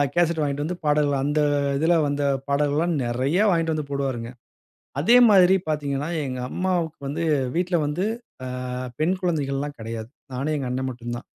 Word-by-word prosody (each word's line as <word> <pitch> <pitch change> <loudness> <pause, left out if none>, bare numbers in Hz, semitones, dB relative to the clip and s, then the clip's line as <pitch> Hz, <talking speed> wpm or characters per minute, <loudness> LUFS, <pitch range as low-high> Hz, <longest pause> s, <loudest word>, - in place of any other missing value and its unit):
Cassette 170 -2 +2
வாங்கிட்டு 145 0 -1
வந்து 180 +2 -3
பாடல். 150 -1 +3
அந்த 145 +2 +1 0.4
இதில 165 +4 +3
வந்த 145 0 -1 0.3
பாடல்லா 145 +3 +2 0.2
நெறையா 130 - +1
வாங்கிட்டு 165 -3 +1
வந்து 150 -2 -4
போடுவாருங்க. 130 -4 -2 0.7
அதே 235 +12 +6
மாதிரி 190 -2 +6
பார்த்தீங்கனா, 145 0 -1 0.2
எங்க 130 -1 -4
அம்மாவுக்கு 175 -3 -1
வந்து 160 +4 -2 0.3
வீட்ல 180 0 +1
வந்து, 150 +6 -1 0.4
ஆ - - -4 0.5
பெண் 175 +5 +1
குழந்தைகள்லாம் 145 -4 -1
கெடையாது. 115 0 -6 0.2
நானும், 140 +4 -1
எங்க 135 - -3
அண்ணே 130 +1 -2
மட்டுந்தான். 120 -1 -6
145 Hz, 150 wpm, -24 LUFS, 135-165 Hz, 0.7 s, அதே